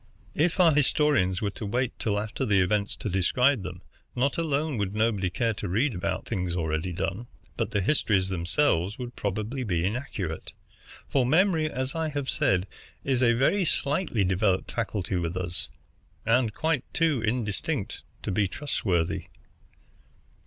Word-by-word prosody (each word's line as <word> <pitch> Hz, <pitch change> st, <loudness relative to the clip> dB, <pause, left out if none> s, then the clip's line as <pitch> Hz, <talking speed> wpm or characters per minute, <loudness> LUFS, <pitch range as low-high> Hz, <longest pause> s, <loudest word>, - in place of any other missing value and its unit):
"If 165 Hz, +4 st, +1 dB
our 170 Hz, -3 st, +6 dB
historians 140 Hz, -, +2 dB
were 100 Hz, -, 0 dB
to 110 Hz, -, -8 dB
wait 125 Hz, +4 st, 0 dB
till 105 Hz, -2 st, 0 dB
after 105 Hz, +1 st, -3 dB
the 100 Hz, -2 st, +3 dB
events 100 Hz, +2 st, +1 dB
to -, -, -5 dB
describe 125 Hz, +8 st, +2 dB
them, 90 Hz, -1 st, -7 dB, 0.3 s
not 135 Hz, +5 st, +1 dB
alone 150 Hz, -4 st, 0 dB
would 100 Hz, 0 st, -2 dB
nobody 105 Hz, -4 st, +1 dB
care 115 Hz, +4 st, 0 dB
to 100 Hz, -, -5 dB
read 120 Hz, +9 st, +1 dB
about 100 Hz, +1 st, -2 dB
things 90 Hz, -5 st, -2 dB
already 80 Hz, +1 st, -1 dB
done, 100 Hz, +7 st, -3 dB, 0.3 s
but -, -, -1 dB
the 105 Hz, -, 0 dB
histories 100 Hz, -5 st, +2 dB
themselves 95 Hz, -, +1 dB
would 125 Hz, -1 st, -6 dB
probably 105 Hz, +6 st, -2 dB
be 90 Hz, -6 st, 0 dB
inaccurate; 100 Hz, -, -4 dB, 0.5 s
for 135 Hz, -, +2 dB
memory, 160 Hz, +3 st, +3 dB
as 130 Hz, -1 st, -3 dB
I 160 Hz, -1 st, -1 dB
have 145 Hz, -2 st, -2 dB
said, 90 Hz, -1 st, +2 dB, 0.4 s
is 130 Hz, -2 st, +1 dB
a 120 Hz, -2 st, +5 dB
very 135 Hz, -, +3 dB
slightly 145 Hz, -, +1 dB
developed 95 Hz, 0 st, +1 dB
faculty 100 Hz, -5 st, -2 dB
with 85 Hz, +1 st, -2 dB
us, 90 Hz, -1 st, -4 dB, 0.6 s
and 115 Hz, 0 st, +3 dB
quite 155 Hz, +3 st, 0 dB
too 160 Hz, -7 st, +2 dB
indistinct 115 Hz, +2 st, -2 dB, 0.2 s
to -, -, -2 dB
be 100 Hz, +1 st, +2 dB
trustworthy. 95 Hz, -, -1 dB
110 Hz, 155 wpm, -27 LUFS, 95-140 Hz, 0.6 s, our